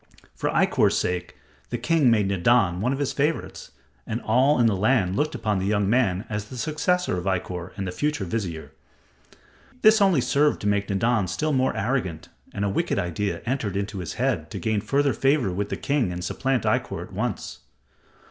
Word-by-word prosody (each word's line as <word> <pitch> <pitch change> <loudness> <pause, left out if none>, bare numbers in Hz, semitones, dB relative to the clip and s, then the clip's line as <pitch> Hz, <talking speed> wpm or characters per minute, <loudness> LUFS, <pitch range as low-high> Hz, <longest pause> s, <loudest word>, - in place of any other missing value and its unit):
For - - -2
Ikkor's - - +2
sake, 90 -1 -2 0.3
the - - -2
king 160 -6 +3
made 105 -4 +3
Nadan 95 -1 +2
one 125 +5 +1
of 135 - -1
his 140 -1 -1
favorites, 150 +4 -2 0.4
and 115 +1 -2
all 130 +5 +3
in 120 - +4
the 110 -3 +3
land 100 -2 +2
looked 150 +7 0
upon 105 -3 -1
the 95 - -2
young 100 -1 +1
man 105 -4 +1
as 105 -1 -4
the 125 +4 -10
successor 155 - 0
of 90 - -8
Ikkor 90 -2 -2
and 100 - -3
the 90 - -3
future 145 -1 -1
vizier. 85 -7 -4 1.1
This 215 -1 +6
only 190 -5 +4
served 145 +4 +2
to 105 - -2
make 100 -1 +1
Nadan 105 +1 +1
still 155 - -1
more 130 0 +1
arrogant, 100 - -2 0.2
and 100 - -2
a - - +1
wicked 100 - -1
idea 95 +4 -2
entered 120 -6 -2
his 100 -3 -3
head - - -1
to - - -6
gain 110 -2 -1
further 140 +5 +1
favor 135 -7 +2
with 100 +3 -3
the - - -3
king 140 -9 0
and 90 0 -5
supplant 130 +6 -1
Ikkor - - -1
at - - -13
once. - - -4
110 Hz, 190 wpm, -24 LUFS, 95-135 Hz, 1.1 s, This